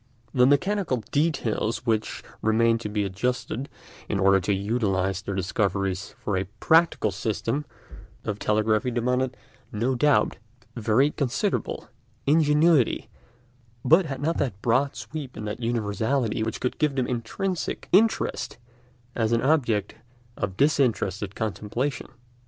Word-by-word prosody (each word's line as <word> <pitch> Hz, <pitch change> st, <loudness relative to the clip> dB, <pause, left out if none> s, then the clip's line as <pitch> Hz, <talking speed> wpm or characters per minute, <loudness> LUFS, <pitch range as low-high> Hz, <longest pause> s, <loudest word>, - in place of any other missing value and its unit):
The 125 Hz, -1 st, +5 dB
mechanical 175 Hz, -, +1 dB
details 130 Hz, -7 st, 0 dB
which 110 Hz, -3 st, -1 dB, 0.2 s
remained 115 Hz, +1 st, +3 dB
to 105 Hz, -, -4 dB
be 105 Hz, 0 st, 0 dB
adjusted 125 Hz, +6 st, -2 dB, 0.4 s
in 100 Hz, -, 0 dB
order 95 Hz, 0 st, +5 dB
to 95 Hz, +3 st, -1 dB
utilise 95 Hz, -2 st, 0 dB
their 100 Hz, 0 st, -4 dB
discoveries 95 Hz, 0 st, -1 dB
for 100 Hz, -, -2 dB
a 95 Hz, +1 st, 0 dB
practical 165 Hz, -9 st, +3 dB
system 115 Hz, +8 st, -2 dB, 0.6 s
of 105 Hz, -1 st, -3 dB
telegraphy 110 Hz, +3 st, +1 dB
demanded, 125 Hz, +2 st, 0 dB, 0.3 s
no 120 Hz, +5 st, 0 dB
doubt, 140 Hz, +3 st, +2 dB, 0.4 s
very 120 Hz, +5 st, +2 dB
considerable 135 Hz, -6 st, -2 dB, 0.4 s
ingenuity, 150 Hz, -2 st, +3 dB, 0.8 s
but 165 Hz, +6 st, +5 dB
had 135 Hz, -1 st, -5 dB
not 165 Hz, +2 st, 0 dB
that 120 Hz, -8 st, -1 dB
broad 130 Hz, +4 st, +2 dB
sweep 145 Hz, -5 st, -7 dB
and 105 Hz, 0 st, -5 dB
that 105 Hz, -, -4 dB
universality 115 Hz, +1 st, 0 dB
which 110 Hz, 0 st, -2 dB
could 125 Hz, -, -2 dB
give 150 Hz, -3 st, +1 dB
them 130 Hz, -2 st, +1 dB
intrinsic 145 Hz, -, -3 dB
interest 215 Hz, -, +2 dB, 0.6 s
as 110 Hz, -1 st, 0 dB
an 115 Hz, 0 st, +2 dB
object 130 Hz, -8 st, +1 dB, 0.4 s
of 95 Hz, -2 st, -3 dB
disinterested 110 Hz, -, +1 dB
contemplation. 115 Hz, +5 st, -3 dB
115 Hz, 125 wpm, -25 LUFS, 105-140 Hz, 0.8 s, The